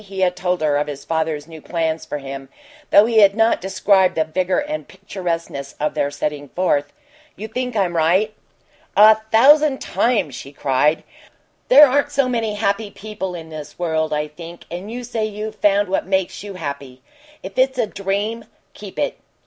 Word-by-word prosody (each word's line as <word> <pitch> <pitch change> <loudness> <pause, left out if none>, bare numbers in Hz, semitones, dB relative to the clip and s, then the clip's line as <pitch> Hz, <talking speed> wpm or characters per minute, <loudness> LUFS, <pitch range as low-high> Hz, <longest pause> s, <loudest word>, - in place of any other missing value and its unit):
He 195 -1 -6
had 180 -1 +2
told 180 -2 -1
her 150 -2 +2
of 145 +1 -1
his 140 -1 -7
father's 160 -1 -2
new 160 -2 -11
plans 165 -1 -2
for 150 - -4
him, 135 -1 -8 0.4
though 205 - +7
he 225 -1 +3
had 200 -1 +6
not 225 0 +2
described 190 0 +2
the 160 - +2
vigor 180 +4 -1
and 300 +1 -3
picturesqueness 170 -7 -5
of 150 - -1
their 140 - 0
setting 145 0 -4
forth. 145 -6 0 0.4
"You 215 - -7
think 250 +2 -4
I'm 185 -4 0
right?" 180 +7 +2 0.6
"A 215 +1 +8
thousand 285 +4 +5
times!" 225 - 0
she 140 +3 -9
cried. 145 +3 +1 0.6
"There 285 +4 +9
aren't 280 +2 +1
so 275 -2 +2
many 225 -4 -1
happy 205 0 -1
people 195 -3 -6
in 165 -2 -9
this 155 -2 -9
world, 160 -2 -1
I 150 0 -1
think 170 +2 -11
and 180 +5 -6
you 245 +1 -5
say 235 -2 -3
you've 215 0 -5
found 205 0 +3
what 190 0 -1
makes 190 -1 -1
you 200 -1 -8
happy. 140 -5 -7 0.4
If 190 - -8
it's 260 0 +2
a 240 - +2
dream 205 +3 -3 0.3
keep - - -11
it!" - - -2
190 Hz, 180 wpm, -20 LUFS, 155-215 Hz, 0.6 s, There